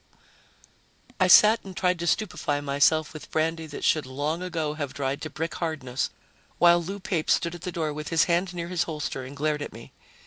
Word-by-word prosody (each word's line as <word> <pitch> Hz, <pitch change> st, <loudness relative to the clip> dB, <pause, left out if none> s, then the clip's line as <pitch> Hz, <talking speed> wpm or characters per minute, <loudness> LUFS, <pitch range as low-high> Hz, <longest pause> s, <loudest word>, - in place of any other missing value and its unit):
I 185 Hz, -, +4 dB
sat 215 Hz, +5 st, +7 dB
and 190 Hz, -2 st, -10 dB
tried 180 Hz, -1 st, +1 dB
to 170 Hz, -, -3 dB
stupefy 165 Hz, -7 st, 0 dB
myself 145 Hz, +2 st, +2 dB
with 155 Hz, -, -10 dB
brandy 160 Hz, 0 st, -1 dB
that 150 Hz, -, -8 dB
should 155 Hz, -4 st, +2 dB
long 145 Hz, +6 st, -2 dB
ago 165 Hz, -4 st, -2 dB
have 145 Hz, -3 st, -5 dB
dried 140 Hz, 0 st, -2 dB
to 155 Hz, -, -5 dB
brick 160 Hz, +2 st, -4 dB
hardness, 140 Hz, -7 st, -2 dB, 0.5 s
while 175 Hz, 0 st, +6 dB
Lou 195 Hz, +4 st, -5 dB
Pape 175 Hz, -4 st, -2 dB
stood 170 Hz, -, +2 dB
at 175 Hz, -, -9 dB
the 180 Hz, 0 st, -4 dB
door 160 Hz, -3 st, -2 dB
with 150 Hz, 0 st, -6 dB
his 165 Hz, -, +4 dB
hand 175 Hz, +1 st, +1 dB
near 170 Hz, 0 st, -4 dB
his 180 Hz, -2 st, 0 dB
holster 150 Hz, -4 st, -4 dB
and 135 Hz, +2 st, -9 dB
glared 150 Hz, 0 st, 0 dB
at -, -, -6 dB
me. 115 Hz, +1 st, -12 dB
160 Hz, 205 wpm, -26 LUFS, 145-175 Hz, 0.5 s, sat